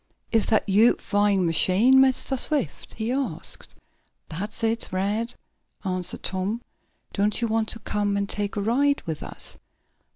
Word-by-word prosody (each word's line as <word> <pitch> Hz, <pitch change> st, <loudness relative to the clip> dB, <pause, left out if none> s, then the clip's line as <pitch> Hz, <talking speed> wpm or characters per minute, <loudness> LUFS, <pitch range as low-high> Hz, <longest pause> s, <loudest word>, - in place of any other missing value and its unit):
"Is 225 Hz, -2 st, +2 dB
dat 215 Hz, -1 st, +2 dB
yo' 215 Hz, +5 st, +5 dB
flyin' 205 Hz, -2 st, +1 dB
machine, 195 Hz, +10 st, +5 dB
Mistah 265 Hz, 0 st, +2 dB
Swift?" 270 Hz, -, 0 dB
he 220 Hz, +2 st, -2 dB
asked. 270 Hz, +1 st, -3 dB, 0.5 s
"That's 205 Hz, +8 st, -5 dB
it, 225 Hz, +1 st, +1 dB
Rad," 205 Hz, +6 st, -1 dB, 0.5 s
answered 185 Hz, -1 st, -3 dB
Tom. 195 Hz, +5 st, -1 dB, 0.5 s
"Don't 205 Hz, +1 st, +1 dB
you 235 Hz, -, 0 dB
want 220 Hz, 0 st, 0 dB
to -, -, -1 dB
come 205 Hz, -1 st, -1 dB
and 200 Hz, 0 st, -1 dB
take 205 Hz, +1 st, -3 dB
a 205 Hz, -, -1 dB
ride 275 Hz, +7 st, +2 dB
with 160 Hz, -2 st, -4 dB
us?" -, -, -5 dB
210 Hz, 150 wpm, -25 LUFS, 195-235 Hz, 0.5 s, yo